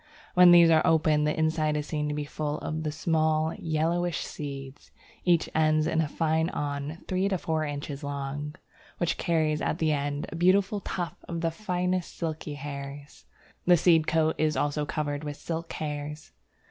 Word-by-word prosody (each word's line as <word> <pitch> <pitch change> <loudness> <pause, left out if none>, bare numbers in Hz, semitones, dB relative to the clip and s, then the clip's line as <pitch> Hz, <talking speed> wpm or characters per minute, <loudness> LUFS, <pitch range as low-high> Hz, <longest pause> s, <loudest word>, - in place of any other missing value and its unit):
When 180 0 +8
these 170 -1 +8
are 160 -1 +6
open, 155 -2 +3
the 150 - 0
inside 155 -1 +1
is 150 - -2
seen 150 -1 -2
to 150 - -2
be 150 0 -3
full 150 0 -3
of 155 +1 -4
the 155 -1 -2
small 155 0 +1
yellowish 165 +1 -1
seeds; 140 -2 -7 0.4
each 175 -2 +3
ends 155 0 +3
in 160 0 +1
a 155 - 0
fine 160 +2 0
awn 145 +1 -4
three 185 +1 +1
to 190 - +1
four 160 -2 -1
inches 145 0 -5
long, 145 +1 -4 0.4
which 175 - 0
carries 155 -2 +1
at - - -1
the 160 -2 +1
end 145 0 -1
a - - -7
beautiful 190 +4 +3
tuft 175 -3 -5
of 170 -1 -3
the 165 -1 +1
finest 180 -1 -2
silky 160 -3 -4
hairs. 140 0 -8 0.4
The 175 -1 +7
seed 165 -1 +4
coat 160 0 +2
is 155 -1 +1
also 145 0 0
covered 145 -1 -2
with 145 -1 -5
silk 165 0 -5
hairs. 150 0 -5
155 Hz, 175 wpm, -28 LUFS, 150-165 Hz, 0.4 s, When